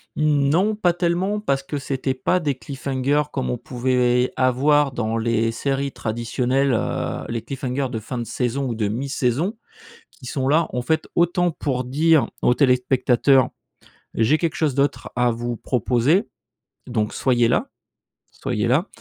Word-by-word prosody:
Non 155 +7 +2
pas 180 -5 +2
tellement 180 +4 0
parce 140 -10 -1
que 145 +1 -4
c'était 135 0 -2
pas 135 +7 0
des 150 -5 0
cliffhangers 135 +2 -1
comme 135 - -2
on 125 - -1
pouvait 125 0 +1
avoir 135 +3 +3
dans 115 -2 -2
les 115 0 +1
séries 135 +3 -2
traditionnelles. 125 +4 -1
Heu, 110 - -2
les 115 -1 -2
cliffhangers 130 +2 -3
de 115 - -3
fin 120 +3 -5
de - - -2
saison 130 +3 -2
ou 120 - -3
de 110 -2 -1
mi-saison, 135 - -1 0.5
qui 130 - -16
sont 130 +1 -2
là 160 +4 +3
en 125 - -1
fait 160 +5 -1
autant 175 +1 +2
pour 130 -5 -2
dire 155 +4 +3 0.2
aux 125 - +3
téléspectateurs: 130 0 +3 0.6
«J'ai 115 +8 +3
quelque 165 -2 -1
chose 150 -5 0
d'autre 140 +1 0
à 125 -1 +3
vous 120 +1 -4
proposer, 130 - +1 0.6
donc 110 -3 -1
soyez 120 -3 +2
là, 265 - 0 0.6
soyez - - -2
là» - - +2
130 Hz, 155 wpm, -22 LUFS, 125-150 Hz, 0.6 s, avoir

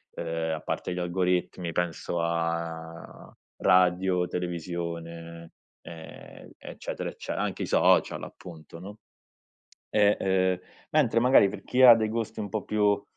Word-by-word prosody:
ehm, 80 -1 -3
a 75 - -8
parte 90 - -3
gli 90 - -4
algoritmi 90 -1 -1
penso 85 0 -2
a 85 0 -4 0.2
radio, 90 0 +3
televisione, 85 -1 -5 0.3
ehm, 80 -1 -12
eccetera - - -6
ecce - - -8
anche - - -2
i - - -1
social - - +3
appunto, 85 -1 -11
no, 100 +4 -10 0.9
e, 105 -1 +4
ehm. 95 -1 +1 0.3
Mentre 115 - +3
magari 125 -5 +6
per - - -8
chi 130 +1 +1
ha 125 -2 +11
dei 110 -1 0
gusti 115 0 -4
un 105 - -4
po' 105 0 -3
più, 105 -1 +1
90 Hz, 130 wpm, -27 LUFS, 85-100 Hz, 0.9 s, ha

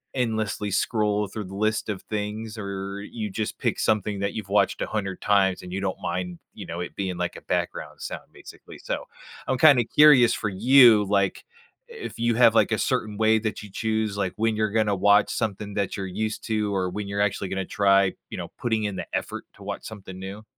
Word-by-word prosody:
endlessly 110 -4 -1
scroll 105 0 +1
through 105 +2 -6
the 95 +1 -9
list 110 +1 0
of 100 -3 -4
things 105 +1 -4
or 100 0 -5
you 105 0 -5
just 110 +2 -3
pick - - -1
something 105 -1 0
that 100 0 -1
you've 110 -3 -5
watched 105 - +2
a - - +1
hundred 95 -3 -3
times 95 -2 +2
and 90 0 -8
you 95 - -2
don't 95 -1 -2
mind, 90 0 -3 0.2
you - - -9
know, 85 - -5
it 90 - -6
being 95 -3 -3
like 90 0 -2
a - - -9
background - - -3
sound - - -6
basically. - - -13
So, - - -4 0.4
I'm 130 - +1
kinda 140 -4 +6
curious 140 -5 +6
for 105 - -2
you, 115 +1 +6
like, 100 -1 0 0.4
if 460 - -8
you 120 -1 +2
have, 125 - +6
like, - - +4
a - - +2
certain 105 -2 -1
way 110 0 +4
that 110 -1 -4
you 105 - -10
choose, 110 0 -1
like, 95 -3 -1
when 110 0 +1
you're 110 -1 +1
gonna 105 -2 +2
watch 100 +2 +4
something 105 -1 -3
that 100 -2 -1
you're 95 - -3
used 110 +3 -3
to 105 -2 -1
or 95 -1 0
when 105 +1 -4
you're 100 0 -3
actually 100 -1 0
gonna 95 0 -2
try, 100 -1 +3 0.2
you - - -6
know, - - -6
putting 110 -2 0
in 100 -2 -2
the - - -5
effort - - -6
to - - -14
watch - - -5
something 95 -4 -9
new. 100 +3 -7
105 Hz, 215 wpm, -25 LUFS, 95-110 Hz, 0.4 s, kinda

